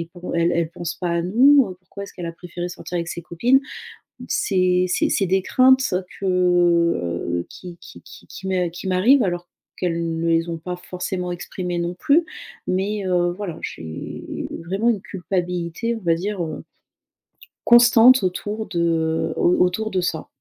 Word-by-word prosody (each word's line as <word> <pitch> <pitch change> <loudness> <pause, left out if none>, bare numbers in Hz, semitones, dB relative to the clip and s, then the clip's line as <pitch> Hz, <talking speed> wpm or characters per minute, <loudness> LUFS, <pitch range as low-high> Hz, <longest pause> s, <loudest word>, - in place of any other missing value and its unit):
et 165 - -4
pen 175 -1 -14
elle 170 +1 +2
elle 170 -1 0
pense 175 -1 -5
pas 180 - -3
à 170 0 0
nous, 235 +1 +4
pourquoi 200 +2 -10
est-ce - - -12
qu'elle 175 -2 -6
a 165 - -4
préféré 175 +1 -6
sortir 175 0 -6
avec 170 0 -2
ses 170 - -5
copines?» 240 - +2 0.7
c'est 185 -2 +2
c'est 180 - +1
c'est 195 - +1
des 190 +1 +2
craintes 260 +5 +4
ça 185 -6 -1 0.2
que 170 - +1
qui 175 -2 -10
qui - - -13
qui - - -14
qui 190 - -8
me 180 -2 0
qui 175 +3 -8
m'arrivent 230 +9 +4
alors 175 -1 -3 0.3
qu'elles 170 -2 -1
ne 165 - 0
les 165 +1 +2
ont 165 - -2
pas 180 +2 -6
forcément 180 0 -4
exprimées 175 0 -4
non 170 +1 -2
plus. 290 - +3 0.4
Mais 195 +2 -1
heu, 175 -1 +2
voilà 185 -4 -6
j'ai 80 -1 -7 0.4
vraiment 200 +6 0
une 210 -5 0
culpabilité 180 +4 -3
on - - -6
va 170 -2 +2
dire, 195 +1 -3
heu 155 -1 -6 1.0
constante 240 -1 +7
autour 210 +4 -3
de 165 -2 0
au 175 - +3
autour 185 +5 +1
de 185 - 0
ça. 165 -3 -3
180 Hz, 175 wpm, -22 LUFS, 170-195 Hz, 1.0 s, constante